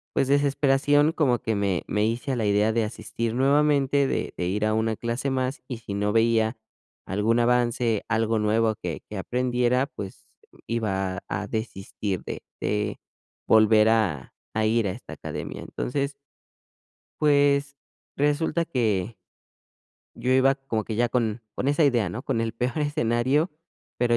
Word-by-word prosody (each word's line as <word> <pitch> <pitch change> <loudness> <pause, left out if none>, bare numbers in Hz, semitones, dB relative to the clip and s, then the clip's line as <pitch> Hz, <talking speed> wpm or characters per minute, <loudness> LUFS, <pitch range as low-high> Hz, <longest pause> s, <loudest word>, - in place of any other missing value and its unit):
pues 135 - +2
desesperación, 145 +1 +3
como 135 -7 +1
que 110 0 -1
me 100 -4 0
me 105 0 +1
hice 115 +5 -2
a - - 0
la 115 -3 -1
idea 105 +2 +3
de 115 0 +1
asistir 115 +1 -4
nuevamente, 140 +1 +3
de - - -2
de 90 - -1
ir 100 +4 -1
a 110 0 +1
una 110 0 0
clase 120 +5 -2
más, 130 +1 -2
y 125 - -4
si 105 -3 -6
no 105 +1 0
veía 115 0 +3 0.5
algún 105 +4 +1
avance, 120 -2 +1
algo 115 0 +1
nuevo 110 +1 +2
que 90 -5 -5
que 105 - -6
aprendiera, 125 +4 +1
pues, 100 -8 -9 0.4
iba 95 -5 -1
a - - -6
a 100 +2 -3
desistir 105 -3 -4
de - - -6 0.2
de 105 -1 -1 0.5
volver 110 0 +5
a 100 - 0 0.2
a 110 0 +1
ir 115 -1 +2
a - - -1
esta - - -9
academia. - - -6
Entonces 140 +2 -3 1.1
pues, 145 -1 +3 0.4
resulta 150 +3 +1
que 115 - 0 1.0
yo 125 - -2
iba 130 +1 +4
como 135 -6 -3
que 110 - -4
ya 120 +1 +2
con 115 -1 -1
con 135 - -1
esa 145 +2 +3
idea, 120 -8 +2
¿no? 110 +8 -5
Con 130 -5 -1
el 115 -1 -1
peor 125 +5 -2
escenario, 145 +1 +1 0.5
pero 120 -1 +2
115 Hz, 160 wpm, -25 LUFS, 110-135 Hz, 1.1 s, volver